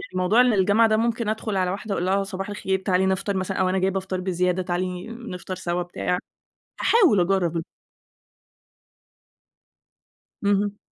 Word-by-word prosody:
موضوع 185 +6 +4
إن 250 -2 +4
الجامعة 205 +3 +4
ده 215 - +3
ممكن 230 -1 0
أدخل 215 -2 -2
على 185 -1 +1
واحدة 200 +1 -4
وأقول 175 - -1
لها 195 +2 +2
صباح 195 0 -5
الخير، 190 -2 -1
تعالي 190 -1 +1
نفطر 190 +1 0
مثلًا 190 0 -2
أو 185 -1 +2
أنا 190 +1 +1
جايبة 190 +1 +1
فطار 185 -1 -4
بزيادة، 180 0 0
تعالي 180 +1 -3
نفطر 225 -6 -7
سوا، 180 -1 -2
بتاع، 180 +1 -2 0.6
هاحاول 385 - +5
أجرب 175 -2 +1 2.8
اهم. 205 0 +1
190 Hz, 150 wpm, -24 LUFS, 180-205 Hz, 2.8 s, هاحاول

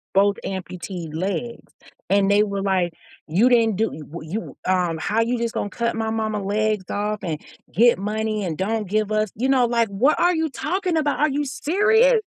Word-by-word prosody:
both 200 +1 +4
amputee 180 -3 -6
legs, 195 +8 -4 0.4
and 200 0 +3
they 205 +1 +5
were 200 -2 -3
like, 185 -3 +1 0.3
"You 185 +10 +3
didn't 230 -4 +4
do 220 +3 0
y - - -8
w 155 +1 -9
you 220 +4 -5
um, 180 -3 +1
how 210 +7 0
you 240 +2 0
just 235 -1 -2
gonna 205 - -2
cut 235 +1 -2
my 225 -1 -1
mama 220 -1 -1
legs 210 0 0
off 210 +1 -2
and 160 -4 -3 0.3
get 235 +1 +4
money 215 +1 -2
and 165 -5 -3
don't 210 +2 -1
give 215 +1 0
us" 215 0 +1
you 255 +5 -1
know, 260 -2 +4
like, 235 -1 +2
"What 230 +10 +2
are 355 0 +3
you 320 0 0
talking 360 +4 -1
about? 295 -2 0
Are 305 - +3
you 290 +1 -1
serious?" 435 - +3
215 Hz, 200 wpm, -22 LUFS, 195-240 Hz, 0.4 s, they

